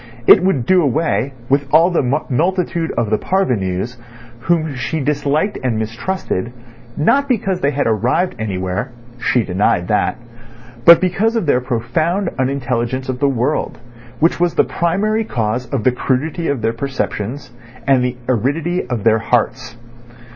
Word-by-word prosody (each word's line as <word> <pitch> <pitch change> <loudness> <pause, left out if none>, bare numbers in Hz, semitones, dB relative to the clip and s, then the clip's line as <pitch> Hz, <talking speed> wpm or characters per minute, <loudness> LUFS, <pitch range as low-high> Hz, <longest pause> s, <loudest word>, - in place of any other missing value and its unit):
It 185 - +8
would 155 -11 +1
do 185 -1 +4
away 140 -2 0 0.2
with 140 +1 +1
all 165 +4 +5
the 175 - +2 0.3
multitude 170 +3 0
of 115 -2 -1
the 110 - +2
"parvenus," 120 - -1 0.4
whom 160 +3 0
she 125 +5 -3
disliked 150 +6 0
and 120 -4 0
mistrusted, 115 - -3 0.5
not 275 - +2
because 195 -6 0
they 140 - +2
had 145 0 -1
arrived 125 - +1
anywhere 95 +4 -3 0.3
(she 125 -1 +1
denied 90 -2 0
that), 105 +3 +1 0.7
but 170 0 +9
because 205 +5 +1
of 225 - 0
their 130 -4 +2
profound 135 - -1
unintelligence 130 -1 -1
of 125 -1 -3
the 140 0 +2
world, 130 +3 -1 0.4
which 165 +2 +2
was 175 -1 +1
the - - +4
primary 210 +6 0
cause 120 - -2
of 135 -6 -2
the 130 - +4
crudity 145 +7 -1
of 135 -6 -2
their 115 +1 +1
perceptions 130 0 -4 0.3
and 135 -2 +3
the 125 0 -2
aridity 145 - 0
of 120 -5 -3
their 110 0 +4
hearts. 115 +1 -1
135 Hz, 150 wpm, -18 LUFS, 120-170 Hz, 0.7 s, but